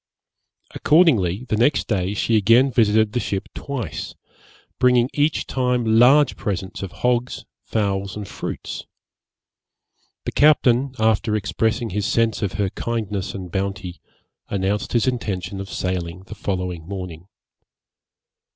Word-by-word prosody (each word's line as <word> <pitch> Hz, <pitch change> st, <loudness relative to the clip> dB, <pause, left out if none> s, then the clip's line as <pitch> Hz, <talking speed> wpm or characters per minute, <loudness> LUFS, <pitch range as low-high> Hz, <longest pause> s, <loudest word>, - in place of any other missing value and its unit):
Accordingly, 125 Hz, -, +3 dB
the 110 Hz, -, 0 dB
next 120 Hz, +7 st, +2 dB
day 95 Hz, -2 st, -1 dB
she 115 Hz, +2 st, +1 dB
again 115 Hz, +6 st, +5 dB
visited 110 Hz, -2 st, +3 dB
the 125 Hz, -, +1 dB
ship 100 Hz, -4 st, -3 dB
twice, 125 Hz, -, -5 dB, 0.6 s
bringing 125 Hz, 0 st, +4 dB
each 150 Hz, +1 st, +1 dB
time 125 Hz, -2 st, 0 dB
large 135 Hz, +3 st, +6 dB
presents 95 Hz, -3 st, -4 dB
of 95 Hz, -2 st, -5 dB
hogs, 125 Hz, 0 st, -1 dB, 0.2 s
fowls, 100 Hz, -2 st, -2 dB
and 105 Hz, -2 st, -6 dB
fruits. -, -, -6 dB, 1.4 s
The -, -, -2 dB
captain, 135 Hz, -3 st, +3 dB
after 110 Hz, -1 st, +2 dB
expressing 110 Hz, +3 st, -1 dB
his 100 Hz, +1 st, -1 dB
sense 115 Hz, -2 st, +1 dB
of 100 Hz, -1 st, -1 dB
her 100 Hz, -2 st, -1 dB
kindness 105 Hz, -5 st, -3 dB
and 90 Hz, -3 st, -7 dB
bounty, 95 Hz, -2 st, -4 dB, 0.5 s
announced 100 Hz, +1 st, -1 dB
his 120 Hz, -2 st, +3 dB
intention 100 Hz, -7 st, -2 dB
of 100 Hz, -, -8 dB
sailing 90 Hz, -1 st, -3 dB
the 95 Hz, -, -10 dB
following 90 Hz, -5 st, -4 dB
morning. 90 Hz, -3 st, -7 dB
105 Hz, 125 wpm, -22 LUFS, 95-120 Hz, 1.4 s, large